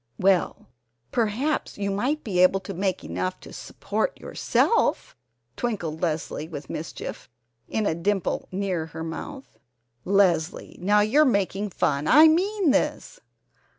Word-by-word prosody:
"Well, 190 Hz, -1 st, +1 dB, 0.5 s
perhaps 240 Hz, +7 st, -1 dB
you 200 Hz, -1 st, -2 dB
might 260 Hz, +10 st, -1 dB
be 190 Hz, -5 st, -1 dB
able 185 Hz, +1 st, +5 dB
to 195 Hz, -, -7 dB
make 190 Hz, 0 st, -2 dB
enough 90 Hz, +3 st, -3 dB
to -, -, -12 dB
support -, -, -3 dB
yourself," -, -, +1 dB, 0.4 s
twinkled 175 Hz, -10 st, -3 dB
Leslie 155 Hz, -2 st, -2 dB
with 145 Hz, -4 st, -8 dB
mischief 155 Hz, -, -6 dB, 0.4 s
in 220 Hz, -, -1 dB
a 160 Hz, -, +1 dB
dimple 195 Hz, +3 st, -1 dB
near 185 Hz, -4 st, -2 dB
her 160 Hz, 0 st, -7 dB
mouth. 265 Hz, -, -8 dB, 0.4 s
"Leslie, 180 Hz, -4 st, +1 dB
now 205 Hz, +3 st, +4 dB
you're 230 Hz, +9 st, +4 dB
making 200 Hz, -5 st, 0 dB
fun! 145 Hz, -4 st, 0 dB
I 305 Hz, +4 st, +8 dB
mean 370 Hz, +1 st, +2 dB
this!" 290 Hz, -, -1 dB
195 Hz, 130 wpm, -25 LUFS, 165-240 Hz, 0.5 s, I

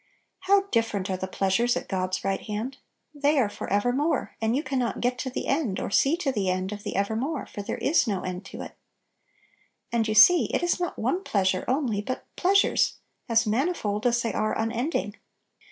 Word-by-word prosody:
How 390 Hz, +1 st, +4 dB
different 210 Hz, -5 st, 0 dB
are 185 Hz, -, -1 dB
the 190 Hz, -, -4 dB
pleasures 195 Hz, +6 st, +1 dB
at -, -, -5 dB
God's 185 Hz, -1 st, -2 dB
right 195 Hz, 0 st, 0 dB
hand! 225 Hz, +6 st, -5 dB, 0.3 s
They 290 Hz, +1 st, +2 dB
are 240 Hz, -6 st, +3 dB
for -, -, -7 dB
ever 205 Hz, +5 st, +2 dB
more, 295 Hz, +5 st, -1 dB
and 225 Hz, +2 st, +1 dB
you 290 Hz, -, 0 dB
can 265 Hz, -2 st, -1 dB
not 240 Hz, -2 st, -1 dB
get 250 Hz, +1 st, 0 dB
to 260 Hz, -, -2 dB
the 255 Hz, -, -4 dB
end 270 Hz, -9 st, 0 dB
or -, -, -4 dB
see 275 Hz, +10 st, +3 dB
to 310 Hz, -6 st, -1 dB
the 200 Hz, -6 st, -1 dB
end 185 Hz, +1 st, -1 dB
of 210 Hz, 0 st, -6 dB
"evermore," 225 Hz, -, -1 dB
for 205 Hz, -, -7 dB
there 200 Hz, -, -4 dB
is 295 Hz, -2 st, +2 dB
no 195 Hz, -4 st, -1 dB
end 185 Hz, +1 st, -5 dB
to -, -, -8 dB
it -, -, -10 dB, 1.2 s
And 230 Hz, -1 st, +1 dB
you 215 Hz, -, -1 dB
see 345 Hz, +11 st, +8 dB
it -, -, 0 dB
is 350 Hz, -, +1 dB
not 350 Hz, -1 st, -3 dB
one 310 Hz, -, -1 dB
pleasure 190 Hz, -, 0 dB
only, 250 Hz, -6 st, 0 dB
but 255 Hz, +5 st, -5 dB
"pleasures" 395 Hz, +2 st, +3 dB, 0.3 s
as 225 Hz, 0 st, +3 dB
manifold 220 Hz, -, 0 dB
as 240 Hz, 0 st, +1 dB
they 230 Hz, -, -1 dB
are 215 Hz, 0 st, 0 dB
unending. 225 Hz, 0 st, -2 dB
230 Hz, 200 wpm, -26 LUFS, 205-275 Hz, 1.2 s, see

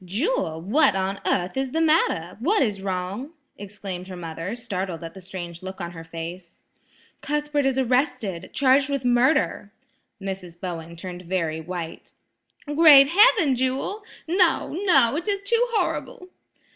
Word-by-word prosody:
"Jewel, 185 Hz, -, -2 dB
what 275 Hz, -, +3 dB
on 195 Hz, +1 st, -2 dB
earth 180 Hz, +3 st, 0 dB
is 265 Hz, -1 st, -2 dB
the 325 Hz, -, +1 dB
matter? 305 Hz, -, +2 dB
What 370 Hz, -, +2 dB
is 205 Hz, -5 st, -2 dB
wrong?" 195 Hz, -, -4 dB, 0.3 s
exclaimed 195 Hz, -3 st, -7 dB
her 185 Hz, -, -8 dB
mother, 165 Hz, +4 st, -5 dB
startled 190 Hz, -7 st, -5 dB
at 165 Hz, -, -7 dB
the 190 Hz, -, -11 dB
strange 175 Hz, -2 st, -8 dB
look 190 Hz, +1 st, -8 dB
on 170 Hz, -2 st, -5 dB
her 165 Hz, -1 st, -9 dB
face. 170 Hz, +2 st, -8 dB, 0.6 s
"Cuthbert 295 Hz, -1 st, -1 dB
is 265 Hz, -1 st, 0 dB
arrested, 255 Hz, -, 0 dB
charged 270 Hz, +1 st, +3 dB
with 275 Hz, -2 st, -2 dB
murder!" 245 Hz, -4 st, +2 dB, 0.5 s
Mrs. 190 Hz, -3 st, -7 dB
Bowen 170 Hz, -2 st, -6 dB
turned 180 Hz, +1 st, -8 dB
very 165 Hz, -3 st, -2 dB
white. 170 Hz, -1 st, -7 dB, 0.6 s
"Great 295 Hz, -2 st, +7 dB
heaven! 370 Hz, -, +5 dB
Jewel! 260 Hz, -, -2 dB, 0.2 s
No, 355 Hz, -2 st, +2 dB
no, 340 Hz, -, +3 dB
it 345 Hz, -, -5 dB
is 400 Hz, -1 st, 0 dB
too 465 Hz, +4 st, +2 dB
horrible!" 450 Hz, -2 st, -2 dB
205 Hz, 145 wpm, -24 LUFS, 180-290 Hz, 0.6 s, Great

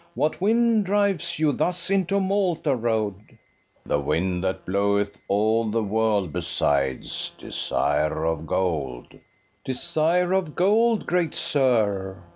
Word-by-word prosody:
What 155 Hz, +4 st, -1 dB
wind 225 Hz, +1 st, +3 dB
drives 195 Hz, -4 st, +1 dB
you 155 Hz, -1 st, +2 dB
thus 180 Hz, +4 st, -1 dB
into 195 Hz, 0 st, +1 dB
Malta 190 Hz, -7 st, 0 dB
road? 110 Hz, -4 st, -1 dB
BASSO. -, -, -24 dB, 0.5 s
The 75 Hz, -, 0 dB
wind 90 Hz, +5 st, -1 dB
that 95 Hz, 0 st, -2 dB
bloweth 100 Hz, +1 st, 0 dB
all 110 Hz, +3 st, +1 dB
the 115 Hz, +1 st, 0 dB
world 105 Hz, -4 st, 0 dB
besides, 70 Hz, -6 st, -1 dB
Desire 75 Hz, +2 st, -1 dB
of 80 Hz, -1 st, -2 dB
gold. 75 Hz, -9 st, -2 dB
FERNEZE. -, -, -19 dB, 0.4 s
Desire 170 Hz, +6 st, 0 dB
of 185 Hz, -6 st, -1 dB
gold, 220 Hz, +4 st, +2 dB
great 175 Hz, -3 st, 0 dB
sir! 110 Hz, -, 0 dB
115 Hz, 125 wpm, -24 LUFS, -, 0.5 s, wind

